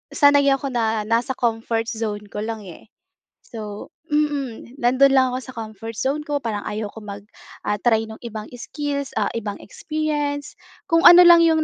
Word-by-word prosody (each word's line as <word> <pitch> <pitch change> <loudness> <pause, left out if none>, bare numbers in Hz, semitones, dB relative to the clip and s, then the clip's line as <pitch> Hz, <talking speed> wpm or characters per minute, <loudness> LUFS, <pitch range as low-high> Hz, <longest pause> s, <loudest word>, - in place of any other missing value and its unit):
sanay 285 -1 +5
ako 275 0 +1
na 225 -3 0
nasa 235 +4 0
comfort 225 -1 -1
zone 215 -3 -4
ko 210 - -5
lang 220 0 -4
eh. 180 0 -12 0.6
So, 210 -3 -8 0.2
mm, 285 -5 -2
nandun 260 +3 +4
lang 260 -1 +4
ako 255 - -2
sa 260 - -10
comfort 225 0 -7
zone 285 +6 -2
ko 290 -2 -2
parang 215 -4 -4
ayaw 210 0 -4
ko 220 - -10
mag 200 -1 -7 0.4
ah, 210 - -1
try 225 0 +2
ng 220 - -10
ibang 215 -2 -7
skills, 280 +2 -4
ah, - - +1
ibang 210 -3 -4
experience. 295 +1 -3 0.3
Kung 330 0 +3
ano 350 +1 +10
lang 345 -1 +8
yung 320 -1 +3
240 Hz, 175 wpm, -22 LUFS, 220-285 Hz, 0.6 s, ano